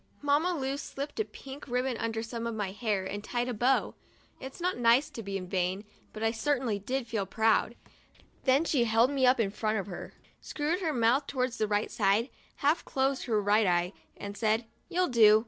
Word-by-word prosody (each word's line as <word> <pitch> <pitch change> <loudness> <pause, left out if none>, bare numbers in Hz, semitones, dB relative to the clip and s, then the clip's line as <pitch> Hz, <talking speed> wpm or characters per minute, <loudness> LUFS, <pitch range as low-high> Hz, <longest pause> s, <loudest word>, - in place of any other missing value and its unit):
Mamma 300 +5 +2
Lu 270 -2 -2
slipped 285 +3 -6
a 435 - +1
pink 275 -4 -10
ribbon 250 0 0
under 225 0 -2
some 230 0 -4
of 230 - -3
my 205 -3 -2
hair 205 -2 -1
and 205 +2 -5
tied 240 +2 -2
a 250 - -2
bow. 245 +5 +2 0.5
It's 265 +4 -9
not 360 +1 0
nice 240 +4 +3
to 230 - -6
be 195 -2 -4
vain, 185 +2 -2 0.3
but 215 - -6
I 225 - +3
certainly 245 -3 0
did 255 +5 -2
feel 220 -4 -2
proud. 225 +2 +2 0.7
Then 270 +4 +4
she 265 -7 +2
held 230 +3 +3
me 265 -2 +3
up 250 0 +4
in 200 -4 +1
front 215 +1 -1
of 195 - -2
her, 180 -3 -8 0.3
screwed 310 +4 -2
her 325 -4 0
mouth 250 +2 +2
towards 255 -2 -1
the 215 - +1
right 210 +1 0
side, 210 +4 +2 0.2
half 300 +4 +1
closed 270 0 0
her 225 -5 +1
right 205 +1 +3
eye, 175 +1 +1 0.2
and 200 0 -6
said: 220 +1 +1 0.2
"You'll 365 +1 +1
do. 215 -3 +7
235 Hz, 200 wpm, -30 LUFS, 210-270 Hz, 0.7 s, do